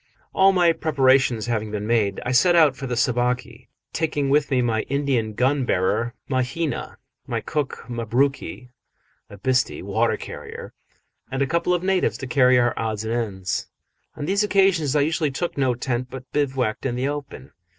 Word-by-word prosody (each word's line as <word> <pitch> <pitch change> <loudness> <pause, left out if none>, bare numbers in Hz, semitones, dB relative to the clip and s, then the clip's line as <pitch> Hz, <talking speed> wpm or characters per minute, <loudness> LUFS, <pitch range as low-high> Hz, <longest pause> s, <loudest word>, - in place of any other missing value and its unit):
All 195 0 +5
my 175 -3 +4
preparations 135 -7 +2
having 110 -3 -2
been 105 0 -4
made, 105 -4 +1
I 125 - -1
set 175 +8 +4
out 155 -5 +5
for 135 0 -6
the 120 -1 -2
Sabaki, 125 +1 -1 0.3
taking 150 -4 -1
with 145 0 +3
me 130 -3 +2
my 110 -2 +1
Indian 135 -6 0
gun 130 +5 +1
bearer 115 +3 0
Mahina, 130 +3 -2 0.3
my - - -1
cook 150 -3 -3
Mabruki, 120 -1 -1 0.6
a 100 - -11
bhisti 130 +2 0
(water 110 +4 +1
carrier), - - -9 0.6
and 135 +1 0
a - - +1
couple 170 +4 +1
of 175 - -3
natives 190 -1 +1
to 135 - -6
carry 130 -1 +4
our 120 -1 +3
odds 110 -1 -2
and 110 +1 -2
ends. 100 -6 -2 0.5
On 145 - -4
these 200 +5 +1
occasions 190 -8 +2
I 145 - +4
usually 155 +1 +1
took 170 +6 -3
no 130 -3 +1
tent, 125 0 -2
but 130 -1 -10
bivouacked 130 -6 -1
in 120 - -2
the 130 +2 -1
open. 145 -2 -6
130 Hz, 170 wpm, -23 LUFS, 120-145 Hz, 0.6 s, All